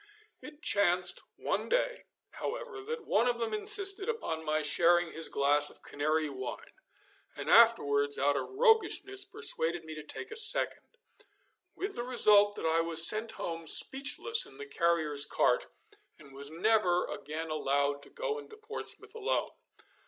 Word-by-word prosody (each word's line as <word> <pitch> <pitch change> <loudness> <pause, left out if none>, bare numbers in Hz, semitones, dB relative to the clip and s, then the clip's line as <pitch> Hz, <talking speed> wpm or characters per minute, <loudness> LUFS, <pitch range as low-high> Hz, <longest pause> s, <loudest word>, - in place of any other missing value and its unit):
It 300 +2 -13
chanced 180 -3 +2
one - - -3
day, - - -1 0.3
however, 475 -4 -7
that 460 +1 -7
one 225 +4 +1
of 240 -1 0
them 230 -2 -4
insisted 395 - +5
upon 300 - -4
my 155 0 -1
sharing 170 +3 +2
his 165 0 -4
glass 145 +1 +2
of - - -15
Canary 155 +2 -2
wine, 130 -3 -8 0.6
and - - -4
afterwards 145 -12 +4
out 145 +1 +1
of - - -4
roguishness 400 -3 +1
persuaded 175 - -3
me 160 - -8
to 155 - -8
take 265 - -8
a - - -7
second, 440 -1 0 0.9
with 395 +1 -5
the 240 - -4
result 210 -5 +4
that - - -6
I 160 +1 +1
was 165 0 +3
sent 220 +3 +2
home 165 -1 -6
speechless 280 - +4
in - - -13
the 430 - -8
carrier's 170 - -1
cart, - - 0 0.5
and 140 -3 -17
was 140 +1 -7
never 180 +1 +1
again 160 +1 -7
allowed 140 -1 -1
to - - -16
go 455 -2 -4
into 435 0 -14
Portsmouth 440 +1 -5
alone. 455 +2 -2
200 Hz, 155 wpm, -30 LUFS, -, 0.9 s, insisted